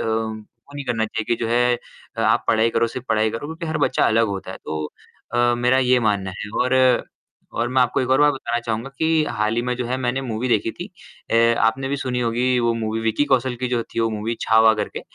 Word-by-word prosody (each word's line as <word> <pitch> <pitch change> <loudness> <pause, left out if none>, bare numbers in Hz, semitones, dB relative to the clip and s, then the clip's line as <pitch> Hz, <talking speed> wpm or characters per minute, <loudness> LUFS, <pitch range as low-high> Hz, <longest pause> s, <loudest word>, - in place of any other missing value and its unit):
अ, - - -2
वो 110 +4 -5
नहीं 140 -1 -5
करना 115 -3 0
चाहिए 110 0 -4
कि 120 - +3
जो - - -2
है 120 0 +2 0.5
आप - - +2
पढ़ाई 115 +1 +3
करो, 115 - +1
सिर्फ़ 130 +2 -7
पढ़ाई 110 0 +2
करो 115 +6 -5
क्योंकि 165 +2 -6
हर 155 -1 -2
बच्चा 130 -3 +2
अलग 115 +1 +3
होता 95 -2 -5
है। - - -7
तो 75 0 -3 0.5
अ, 120 0 +3
मेरा 125 +2 +3
ये 125 -1 +3
मानना 100 -4 0
है 105 - -6
और 125 +1 +1 0.8
और 115 +1 0
मैं 130 +1 +2
आपको 125 0 0
एक 130 0 -2
और 135 +2 +4
बात 150 0 +5
बताना 120 -2 -2
चाहूँगा 115 +2 -3
कि 160 -1 +2
हाल 110 +1 0
ही - - +2
में 125 0 -1
जो 125 - -3
है 125 +2 -1
मैंने 130 +1 -1
मूवी 120 0 -3
देखी 115 -1 +1
थी। - - -7 0.4
अ, 115 +1 +3
आपने 135 +4 -1
भी 140 - -1
सुनी 125 -2 -2
होगी 125 +2 +1
वो 120 0 +2
मूवी 110 0 -2
विक्की 115 +5 +1
कौशल 130 -1 +2
की 125 - -1
जो 120 -1 0
थी 115 - -5
वो 115 - +2
मूवी 110 +2 -3
छावा 110 0 +5
करके, 105 - -4
120 Hz, 240 wpm, -22 LUFS, 110-130 Hz, 0.8 s, बात